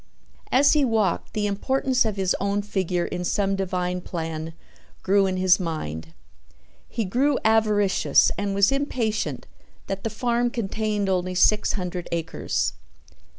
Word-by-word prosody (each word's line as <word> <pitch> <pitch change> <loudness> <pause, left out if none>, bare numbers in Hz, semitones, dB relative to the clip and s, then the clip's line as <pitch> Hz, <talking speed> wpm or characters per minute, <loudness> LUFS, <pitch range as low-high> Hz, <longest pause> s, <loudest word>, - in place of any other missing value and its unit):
As 280 +2 +5
he 300 -2 +3
walked 220 -7 0
the 210 -1 -1
importance 255 +5 +1
of 215 -2 -1
his 190 -2 0
own 200 +1 0
figure 185 -4 -1
in 180 0 -4
some 195 +2 0
divine 180 -1 -2
plan 165 -2 -5 0.5
grew 195 0 +3
in 185 0 -2
his 185 0 +4
mind. 80 - -5 0.7
He 225 -2 -2
grew 260 +8 +1
avaricious 210 -3 +3
and 200 -1 -2
was 200 +3 +4
impatient 250 -6 -2 0.4
that 195 0 -5
the 225 - -1
farm 240 +2 0
contained 215 -2 -2
only 185 -1 -1
six 210 +3 +3
hundred 180 -2 -4
acres. 165 -1 -2
200 Hz, 140 wpm, -24 LUFS, 180-220 Hz, 0.7 s, As